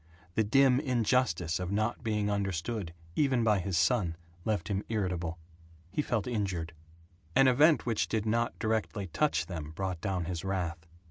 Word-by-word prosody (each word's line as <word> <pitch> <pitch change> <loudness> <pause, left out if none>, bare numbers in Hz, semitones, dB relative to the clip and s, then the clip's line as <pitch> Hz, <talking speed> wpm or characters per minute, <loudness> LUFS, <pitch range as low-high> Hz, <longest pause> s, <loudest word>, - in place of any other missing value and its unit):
The 110 - +2
dim 130 +4 +4
injustice 120 - +1
of 90 0 -3
not 110 +4 0
being 105 -2 0
understood 100 -1 -2 0.2
even 135 -5 +2
by 105 -3 +3
his 95 -1 -1
son 85 +1 +2 0.3
left 110 -2 0
him 100 -1 -1
irritable. 90 -6 -1 0.5
He 125 - 0
felt 120 -7 -1
injured. 95 -8 -2 0.6
An 135 - +6
event 145 +5 +5
which 115 -3 0
did 110 -1 -1
not 115 +2 0
directly 110 -2 -1
touch 150 - +1
them 80 -4 -6
brought 95 -2 -3
down 95 -4 -1
his 85 0 -4
wrath. 85 -4 -3
105 Hz, 155 wpm, -30 LUFS, 90-115 Hz, 0.6 s, An